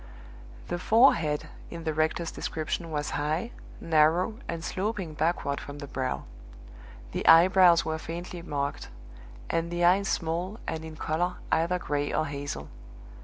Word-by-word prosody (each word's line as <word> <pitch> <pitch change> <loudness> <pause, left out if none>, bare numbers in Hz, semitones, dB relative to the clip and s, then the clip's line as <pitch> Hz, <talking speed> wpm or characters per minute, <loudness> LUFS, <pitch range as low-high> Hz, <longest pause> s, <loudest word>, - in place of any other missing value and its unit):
The 175 - -2
forehead 175 - +4 0.2
in 170 -1 -7
the 160 -1 -1
rector's 160 +2 0
description 160 +2 -3
was 150 -2 -2
high, 155 +10 -1 0.3
narrow, 165 +7 +2
and 165 -1 -4
sloping 190 -3 -3
backward 150 -3 -1
from 145 0 -8
the 145 - -6
brow; 130 - -3 0.9
the - - -3
eyebrows 175 0 +7
were 160 0 -2
faintly 170 +2 -6
marked; 145 -4 -3 0.6
and 165 0 -1
the 175 0 -1
eyes 195 +3 +4
small, 175 +6 -2
and 160 0 -4
in 160 -1 -8
color 165 +4 -1 0.2
either 170 +3 +2
gray 145 -4 -2
or 155 - +1
hazel. 140 - -5
165 Hz, 140 wpm, -28 LUFS, 150-175 Hz, 0.9 s, eyebrows